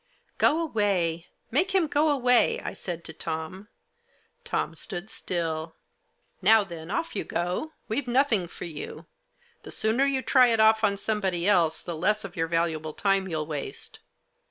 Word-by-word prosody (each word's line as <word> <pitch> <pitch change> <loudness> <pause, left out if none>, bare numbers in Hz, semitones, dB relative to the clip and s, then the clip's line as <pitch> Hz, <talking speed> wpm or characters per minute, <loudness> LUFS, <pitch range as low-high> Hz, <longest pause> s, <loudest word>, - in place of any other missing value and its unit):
" - - -46
Go 315 - +4
away! 190 - 0 0.2
Make 365 - +1
him 370 -3 +4
go 300 +1 +2
away! 250 -4 +3
" - - -15
I - - -3
said 170 -2 -5
to 160 - -7
Tom. 160 +5 -5 0.8
Tom - - -2
stood 195 +1 -6
still. 160 -2 -3 0.3
" - - -44
Now 220 -1 +6
then, 170 -3 -9
off 330 +11 -2
you - - -1
go! 180 - -2
We've 250 +4 -2
nothing 240 -7 +2
for - - -8
you. 160 -3 -7 0.6
The - - -11
sooner 225 +5 +1
you 265 -1 0
try 255 0 +5
it 230 -2 +2
off 220 0 +5
on 200 -2 +3
somebody 195 -4 -1
else, 170 -6 +3
the 170 - -4
less 210 +6 +1
of 195 -3 -8
your 165 0 0
valuable 160 -2 -1
time 195 +1 +1
you'll 160 -3 -2
waste." 150 -3 -4
195 Hz, 175 wpm, -27 LUFS, 165-240 Hz, 0.8 s, Now